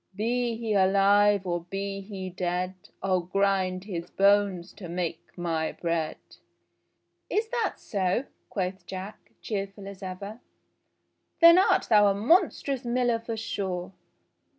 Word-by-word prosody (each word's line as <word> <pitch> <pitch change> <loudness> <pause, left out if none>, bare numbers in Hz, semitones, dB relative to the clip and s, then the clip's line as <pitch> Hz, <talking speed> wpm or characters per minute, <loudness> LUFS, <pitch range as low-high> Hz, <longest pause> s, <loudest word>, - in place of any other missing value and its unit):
Be 235 +3 0
he 225 -1 -2
alive, 200 +1 +4
or 175 -1 -1
be 195 +2 -4
he 190 -2 -7
dead, 180 +1 -2 0.3
I'll 190 -1 +2
grind 185 0 0
his 175 -4 -5
bones 200 -3 +2
to 180 -5 -9
make 170 -1 -4
my 165 -2 -1
bread 165 -2 -2 0.6
!'* - - -49 0.2
"Is 440 +2 0
that 475 -2 -1
SO.?" 190 +3 0 0.3
quoth 190 -1 -3
Jack, 190 +3 -8
cheerful 200 -1 -4
as 200 -1 -9
ever. 200 +4 -7 1.0
"Then 335 +1 +9
art 375 0 +3
thou 210 -2 +6
a 200 - +2
monstrous 275 - +2
miller 240 -1 +1
for 230 0 -5
sure 190 -4 -3
195 Hz, 130 wpm, -27 LUFS, 185-220 Hz, 1.0 s, Then